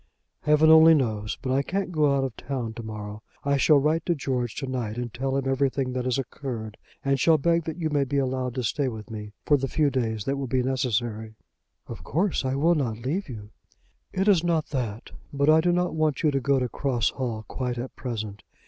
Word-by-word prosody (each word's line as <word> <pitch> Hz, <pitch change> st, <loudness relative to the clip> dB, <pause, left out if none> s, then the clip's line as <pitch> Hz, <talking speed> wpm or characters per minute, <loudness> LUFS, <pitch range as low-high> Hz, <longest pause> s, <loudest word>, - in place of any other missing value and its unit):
"Heaven 150 Hz, +1 st, +5 dB
only 160 Hz, 0 st, +8 dB
knows. 110 Hz, -7 st, -1 dB
But 130 Hz, -, -1 dB
I 135 Hz, -, +3 dB
can't 190 Hz, +5 st, -2 dB
go 150 Hz, -4 st, +3 dB
out 135 Hz, -, +1 dB
of 130 Hz, -4 st, -3 dB
town 125 Hz, -5 st, -4 dB
to 115 Hz, -, -7 dB
morrow. 105 Hz, -1 st, -7 dB, 0.2 s
I 140 Hz, 0 st, +2 dB
shall 150 Hz, +2 st, +5 dB
write 155 Hz, +3 st, +1 dB
to 175 Hz, -, +2 dB
George 125 Hz, -5 st, -2 dB
to 140 Hz, -, -3 dB
night 120 Hz, -4 st, -3 dB
and 120 Hz, -2 st, -4 dB
tell 135 Hz, +2 st, -1 dB
him 135 Hz, -1 st, -2 dB
everything 135 Hz, -1 st, 0 dB
that 125 Hz, -1 st, -2 dB
has 130 Hz, 0 st, +1 dB
occurred, 120 Hz, -5 st, -5 dB, 0.3 s
and 135 Hz, 0 st, +2 dB
shall 160 Hz, +4 st, +5 dB
beg 170 Hz, +2 st, +1 dB
that 160 Hz, +1 st, -4 dB
you 160 Hz, -3 st, -2 dB
may 145 Hz, -1 st, +2 dB
be 140 Hz, +1 st, -2 dB
allowed 130 Hz, -2 st, -1 dB
to 130 Hz, -, -2 dB
stay 135 Hz, +5 st, 0 dB
with 110 Hz, -2 st, -6 dB
me 105 Hz, -1 st, -7 dB
for 145 Hz, -, +4 dB
the 135 Hz, 0 st, -2 dB
few 145 Hz, 0 st, +1 dB
days 110 Hz, -5 st, -1 dB
that 140 Hz, +1 st, -1 dB
will 135 Hz, -1 st, -3 dB
be 125 Hz, +1 st, +1 dB
necessary." 120 Hz, -4 st, -1 dB, 0.5 s
"Of -, -, -9 dB
course 175 Hz, +2 st, 0 dB
I 130 Hz, 0 st, -1 dB
will 160 Hz, +5 st, +3 dB
not 125 Hz, -9 st, -1 dB
leave 150 Hz, -, -3 dB
you." 105 Hz, -3 st, -8 dB, 0.6 s
"It 190 Hz, +2 st, -1 dB
is 185 Hz, -5 st, +5 dB
not 165 Hz, -3 st, 0 dB
that. 120 Hz, -6 st, -4 dB, 0.2 s
But 140 Hz, +2 st, +3 dB
I 160 Hz, +1 st, +6 dB
do 175 Hz, +1 st, +2 dB
not 180 Hz, 0 st, +1 dB
want 155 Hz, -2 st, 0 dB
you 155 Hz, -, +4 dB
to 135 Hz, -, +1 dB
go 140 Hz, +1 st, +2 dB
to 125 Hz, -1 st, 0 dB
Cross 125 Hz, -2 st, 0 dB
Hall 115 Hz, -5 st, -4 dB
quite 125 Hz, -2 st, -3 dB
at 125 Hz, +2 st, -6 dB
present. 110 Hz, -5 st, -5 dB
135 Hz, 230 wpm, -26 LUFS, 120-150 Hz, 0.6 s, only